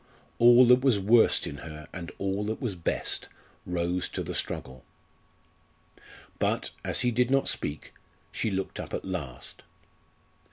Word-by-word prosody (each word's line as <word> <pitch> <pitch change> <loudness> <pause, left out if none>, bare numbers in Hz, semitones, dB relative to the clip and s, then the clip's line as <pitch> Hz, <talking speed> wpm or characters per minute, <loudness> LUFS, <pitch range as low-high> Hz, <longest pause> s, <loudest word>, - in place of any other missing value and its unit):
All 120 +1 +8
that 125 +1 +6
was 130 -6 +3
worst 110 +4 +4
in 70 - -6
her 75 0 -9
and 85 -2 -6
all 100 +1 -1
that 110 +1 -3
was 120 -7 -2
best 85 - -1 0.4
rose 90 0 -1
to - - -4
the - - -5
struggle. 65 -1 -3 1.6
But, - - 0
as - - +1
he 125 - +2
did 125 +1 +2
not 135 0 +2
speak, 75 0 -3 0.4
she 110 - -1
looked 95 -1 -3
up - - -4
at - - -5
last. 75 -10 -6
95 Hz, 150 wpm, -28 LUFS, 85-120 Hz, 1.6 s, All